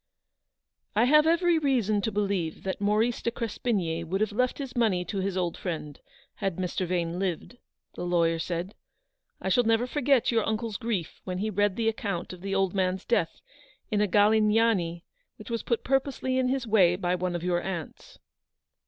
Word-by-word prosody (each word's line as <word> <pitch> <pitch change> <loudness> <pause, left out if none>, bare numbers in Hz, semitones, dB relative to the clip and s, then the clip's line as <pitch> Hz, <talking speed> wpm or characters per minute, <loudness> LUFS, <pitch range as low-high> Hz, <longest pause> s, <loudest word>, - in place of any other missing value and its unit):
"I 215 - +4
have 300 +5 +5
every 340 0 +3
reason 235 -8 +1
to 220 - -1
believe 195 -6 -1
that 190 +1 -3
Maurice 215 +4 +1
de - - 0
Crespigny 205 -8 -2
would 180 +4 -2
have 215 0 +1
left 250 +4 0
his 270 -3 -6
money 205 -7 +1
to 195 +3 -3
his 190 0 -2
old 175 -2 -1
friend 155 -5 -5 0.4
had 195 -4 -2
Mr. 185 0 -2
Vane 170 -1 -1
lived/' 190 +5 -3 0.4
the - - -6
lawyer 170 -2 +2
said. 175 +4 -3 0.7
"I 190 - -2
never 225 +1 +2
shall 250 - -12
forget 275 -4 +3
your 225 -2 +2
uncle's 220 -1 -2
grief 205 -8 -3
when 185 -1 -4
he 215 +3 -2
read 205 -1 +1
the 225 0 -1
account 200 -6 -2
of 180 - -11
the 195 0 -2
old 195 -2 +1
man's 185 -1 0
death - - 0 0.5
in 210 -1 +2
a - - +4
c - - -5
Galignani' 210 -4 +3 0.3
which 215 +2 -11
was 230 - -1
put 235 - -1
purposely 265 -1 0
in 255 - +2
his 260 0 -1
way 195 -6 +4
by 180 -1 -1
one 180 0 -1
of 175 - -4
your 175 -1 +1
aunts." 175 -5 -6
205 Hz, 190 wpm, -27 LUFS, 180-230 Hz, 0.7 s, have